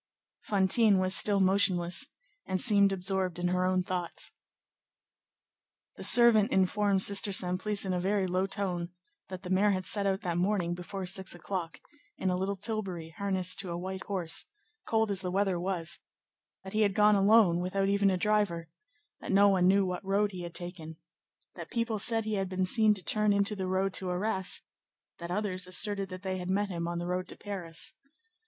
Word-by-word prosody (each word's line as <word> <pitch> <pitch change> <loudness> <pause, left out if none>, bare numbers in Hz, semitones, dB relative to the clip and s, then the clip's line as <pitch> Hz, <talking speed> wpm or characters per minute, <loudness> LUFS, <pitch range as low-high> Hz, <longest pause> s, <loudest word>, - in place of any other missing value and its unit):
Fantine 205 +1 +3
was 185 0 +2
still 205 -2 +5
motionless 185 -2 +3 0.4
and 185 -1 -1
seemed 200 -3 +4
absorbed 185 -1 -1
in 175 0 -1
her 180 0 0
own 185 0 +1
thoughts. 180 -2 -3 1.6
The - - -9
servant 235 -2 +5
informed 195 +1 +2
Sister 200 +1 +3
Simplice 190 +2 0
in 190 - -1
a 180 - -1
very 195 +2 0
low 185 +1 -1
tone, 180 -4 -3 0.4
that 185 0 -8
the 180 - -6
mayor 195 +3 +3
had 185 -2 -1
set 200 -2 +1
out 195 +1 -1
that 175 -5 -2
morning 180 -2 0
before 185 +2 -6
six 190 0 -4
o'clock, 170 -3 -5 0.4
in 185 - -1
a - - 0
little 190 +2 -2
tilbury 190 -6 -3
harnessed 190 -2 0
to 195 -2 -1
a 170 - -4
white 190 +1 -6
horse, 180 -5 -2 0.4
cold 220 -2 +1
as 190 -2 +1
the 180 - -3
weather 190 -1 0
was; 175 -2 -2 0.6
that 190 - -9
he 215 - +1
had 200 -2 +1
gone 210 0 +5
alone, 200 -3 +4
without 195 +2 -1
even 200 0 +2
a 185 - 0
driver; 190 -5 0 0.5
that - - -6
no 200 +1 +5
one 185 -2 +3
knew 195 +1 +4
what 180 +1 -4
road 200 +2 0
he 185 -2 -7
had 170 -1 -8
taken; 165 -3 -7 0.6
that - - -9
people 230 -2 -2
said 225 +1 +1
he 215 - -3
had 195 -2 -2
been 185 0 -1
seen 215 +2 +3
to 190 - -6
turn 210 +2 +2
into 200 +1 +1
the 190 -2 -4
road 190 +1 -1
to 185 -1 0
Arras; 190 +1 -1 0.6
that 170 0 -7
others 185 -1 -2
asserted 200 +1 +2
that 185 0 -9
they 190 -1 -3
had 180 0 -6
met 200 +2 0
him 170 -2 -4
on 170 0 -3
the 175 - -4
road 180 +1 -3
to - - -8
Paris. 180 -5 -5
190 Hz, 190 wpm, -29 LUFS, 180-200 Hz, 1.6 s, still